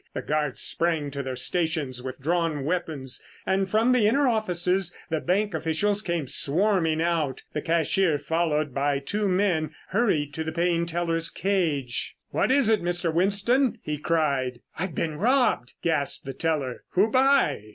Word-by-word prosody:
The - - -3
guards 150 -3 -1
sprang 160 -4 0
to 140 0 -4
their 130 -1 -4
stations 150 -3 -1
with 130 +1 -6
drawn 160 -1 0
weapons 155 -6 -2 0.2
and 190 0 +1
from 225 +5 +3
the 245 -4 +4
inner 275 +5 +3
offices 185 -5 0 0.2
the 160 - +1
bank 195 +5 0
officials 160 +6 0
came 170 -6 -2
swarming 165 +3 +1
out. 165 -5 0
The 150 - -2
cashier, 165 +1 +2
followed 150 -1 0
by 140 +1 +1
two 205 +9 -1
men, 180 -5 +1
hurried 175 - +1
to 160 - -3
the 160 - -3
paying 170 0 +1
teller's 165 -1 -1
cage. 160 -10 -1 0.2
"What - - +1
is 275 -3 +4
it, 220 -2 +3
Mr. 175 -1 -1
Winston?" 210 - +2
he 150 -1 -3
cried. 140 -7 0
"I've 180 -2 -4
been 155 -2 -2
robbed!" 240 - +2
gasped 150 -5 0
the 135 - -5
teller. 140 -3 -2
"Who 205 +4 +3
by? 260 - +3
165 Hz, 160 wpm, -26 LUFS, 145-195 Hz, 0.2 s, the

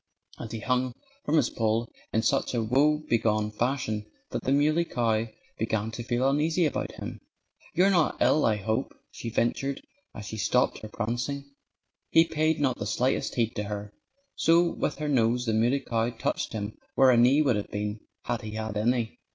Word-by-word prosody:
And 115 - -7
he 110 -1 -5
hung 125 +2 0 0.3
from 155 +2 +2
his - - +2
pole 115 +1 0 0.2
in 110 - +1
such 135 +1 +1
a 115 - +1
woebegone 115 -5 +2
fashion 110 -2 -1 0.2
that - - -2
the 130 - +1
Muley 155 +4 +3
Cow 115 -7 0 0.3
began 110 0 -1
to 120 - -6
feel 120 +2 +1
uneasy 155 +5 +2
about 150 - -2
him. - - -7 0.6
"You're 190 +3 +5
not 170 -5 +2
ill, 130 +5 +4
I 110 - +3
hope?" 110 +5 -2 0.2
she 115 - -6
ventured, 130 +4 0 0.4
as 105 - -7
she 110 - -6
stopped 100 - +1
her 110 - -8
prancing. 120 +6 -3 0.6
He 165 0 +6
paid 160 0 +1
not 135 -4 +1
the 100 - -3
slightest 125 +5 0
heed 115 -1 0
to 105 - -1
her. 105 0 -6 0.4
So 170 +1 +3
with - - -2
her 150 - -3
nose 125 -3 +2
the 115 - 0
Muley 120 +5 +2
Cow 115 -2 0
touched 115 -2 -3
him 105 -1 -5 0.2
where 135 -1 +6
a - - +5
knee 130 +6 +5
would 130 -6 +2
have 105 - -3
been, 105 +1 -3 0.2
had 120 -2 -2
he 110 0 -7
had 110 -1 -3
any. 115 +1 0
120 Hz, 185 wpm, -27 LUFS, 110-140 Hz, 0.6 s, He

